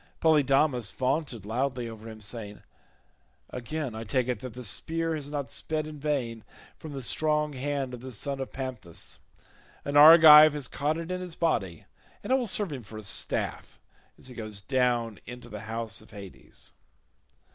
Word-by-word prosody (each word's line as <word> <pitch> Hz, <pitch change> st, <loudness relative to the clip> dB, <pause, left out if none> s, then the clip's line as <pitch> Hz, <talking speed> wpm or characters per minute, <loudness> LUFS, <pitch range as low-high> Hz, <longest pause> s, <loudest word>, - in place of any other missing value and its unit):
Polydamas 140 Hz, -6 st, +3 dB
vaunted 130 Hz, -, -2 dB
loudly 125 Hz, +2 st, -2 dB
over 115 Hz, 0 st, -9 dB
him 110 Hz, -1 st, -11 dB
saying, 105 Hz, -1 st, -5 dB, 0.9 s
"Again 130 Hz, +1 st, -4 dB
I 110 Hz, +1 st, -6 dB
take 125 Hz, +2 st, 0 dB
it 125 Hz, -4 st, -1 dB
that 125 Hz, 0 st, -8 dB
the 125 Hz, -, -7 dB
spear 165 Hz, +9 st, 0 dB
has 145 Hz, -2 st, -4 dB
not 140 Hz, -5 st, -4 dB
sped 155 Hz, -1 st, -3 dB
in 155 Hz, -1 st, -9 dB
vain 130 Hz, -7 st, -2 dB, 0.3 s
from 155 Hz, -2 st, -9 dB
the 135 Hz, -2 st, -5 dB
strong 150 Hz, +2 st, +1 dB
hand 135 Hz, -1 st, -3 dB
of 120 Hz, -, -7 dB
the 130 Hz, 0 st, -8 dB
son 135 Hz, +4 st, -2 dB
of 135 Hz, -, -5 dB
Panthous; 130 Hz, -10 st, -6 dB, 0.7 s
an 140 Hz, -, -3 dB
Argive 155 Hz, 0 st, +10 dB
has 145 Hz, -4 st, -3 dB
caught 150 Hz, +5 st, -1 dB
it 165 Hz, +2 st, -5 dB
in 185 Hz, 0 st, -3 dB
his 180 Hz, -2 st, -7 dB
body, 95 Hz, -, -1 dB, 0.4 s
and 255 Hz, -, 0 dB
it -, -, +6 dB
will 255 Hz, -3 st, 0 dB
serve 200 Hz, -2 st, +1 dB
him 130 Hz, -, -6 dB
for 110 Hz, 0 st, -11 dB
a 110 Hz, -, -8 dB
staff 95 Hz, -, -2 dB, 0.4 s
as -, -, -9 dB
he 130 Hz, -, -7 dB
goes 110 Hz, -4 st, -6 dB
down 120 Hz, -1 st, 0 dB
into 120 Hz, 0 st, -9 dB
the 105 Hz, -, -7 dB
house 115 Hz, -1 st, -3 dB
of -, -, -18 dB
Hades." 100 Hz, -4 st, -10 dB
130 Hz, 180 wpm, -28 LUFS, 115-150 Hz, 0.9 s, Argive